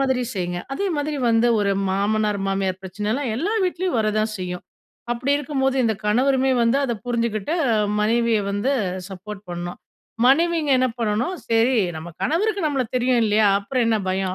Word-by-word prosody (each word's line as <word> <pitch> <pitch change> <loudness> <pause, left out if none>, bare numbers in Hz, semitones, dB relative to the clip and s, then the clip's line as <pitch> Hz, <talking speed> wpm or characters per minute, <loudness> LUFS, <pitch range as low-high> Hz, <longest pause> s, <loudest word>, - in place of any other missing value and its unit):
மாதிரி 260 -2 +1
செய்ங்க. 175 -1 -2
அதே 400 +7 -1
மாதிரி 295 +1 -2
வந்த 230 +1 +3
ஒரு 200 -1 +1 0.2
மாமனார், 210 +1 0
மாமியார் 190 -1 -1
பிரச்சனைலாம், 210 +7 -2
எல்லா 390 - -1
வீட்லயும் 360 -6 -1
வரதான் 215 0 0
செய்யும். 180 -1 -5 0.5
அப்டி 250 +4 0
இருக்கும்போது, 270 -2 -1
இந்த 220 -1 +2
கணவருமே 265 +4 +2
வந்து, 230 +3 +3
அத 250 - -1
புரிஞ்சுகிட்டு, 235 +2 -1 0.2
அ - - +3 0.3
மனைவிய 230 +1 +2
வந்து 205 +7 0 0.4
சப்போர்ட் 195 +2 -8
பண்ணும். 175 0 -5 0.5
மனைவிங்க 320 +3 +3
என்ன 255 - +3
பண்ணணும், 230 - 0 0.2
சரி 230 +3 +3 0.2
நம்ம 160 +2 -7
கணவருக்கு, 405 +6 +1
நம்மள 280 -3 0
தெரியும், 250 0 +2
இல்லையா. 215 0 +3
அப்புறம் 245 +5 -1
என்ன 225 -1 +3
பயம். 185 0 -1
230 Hz, 155 wpm, -22 LUFS, 205-270 Hz, 0.5 s, வந்த